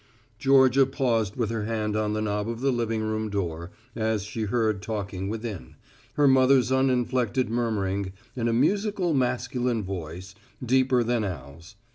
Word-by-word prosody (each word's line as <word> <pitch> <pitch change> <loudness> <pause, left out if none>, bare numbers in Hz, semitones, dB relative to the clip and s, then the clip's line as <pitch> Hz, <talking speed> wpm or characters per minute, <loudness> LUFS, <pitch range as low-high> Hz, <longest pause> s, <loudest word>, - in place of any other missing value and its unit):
Georgia 135 -1 +5
paused 115 -7 0
with 115 -3 -1
her 110 -2 -2
hand 110 -1 -2
on 105 -1 0
the 110 0 -1
knob 105 +1 -1
of 115 0 -4
the 135 +2 +1
living 115 -2 -1
room 110 0 -2
door, 85 -4 -3 0.3
as 110 -3 0
she 110 +1 -4
heard 110 -2 0
talking 100 -3 -4
within, 110 - -6 0.4
her 145 -1 +4
mother's 130 -1 +4
uninflected 130 -2 +1
murmuring 100 -5 -1 0.2
and 120 -2 0
a - - +2
musical 185 - +1
masculine 125 -2 0
voice, 90 -1 -6 0.3
deeper 130 0 +3
than 120 -1 0
Al's. 85 +1 -7
115 Hz, 150 wpm, -26 LUFS, 105-125 Hz, 0.4 s, Georgia